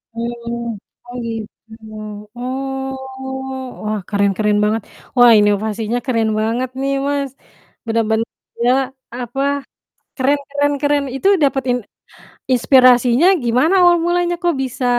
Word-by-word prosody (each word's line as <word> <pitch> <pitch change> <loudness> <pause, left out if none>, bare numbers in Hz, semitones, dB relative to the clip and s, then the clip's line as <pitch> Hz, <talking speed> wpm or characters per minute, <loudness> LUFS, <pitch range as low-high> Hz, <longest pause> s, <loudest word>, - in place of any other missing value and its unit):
Oh, 235 -1 -4 0.3
oh - - -9
gitu. 225 0 -7 0.7
Oh, 265 +1 -3 0.9
wah, 215 0 -1
keren 200 -1 +2
keren 210 -1 +2
banget. 215 +1 +1 0.4
Wah, 245 -1 +8
inovasinya 215 +3 0
keren 230 -4 +1
banget 235 +4 -1
nih, 275 0 0
Mas. 280 -1 -1 0.6
Bener-bener 225 0 0 0.3
dia, 240 +2 +3 0.4
apa 250 +2 -4 0.8
keren 280 +2 +2
keren 285 +1 +1
keren. 290 -1 +1
Itu 325 +9 +1 0.2
dapet 270 -1 +1
in 250 - +1 0.8
inspirasinya 255 +3 +5 0.2
gimana 255 +10 +2
awal 350 -1 +6
mulanya? 350 0 +1
Kok 345 -1 +2
bisa 255 0 -4
245 Hz, 115 wpm, -18 LUFS, 225-275 Hz, 0.9 s, Wah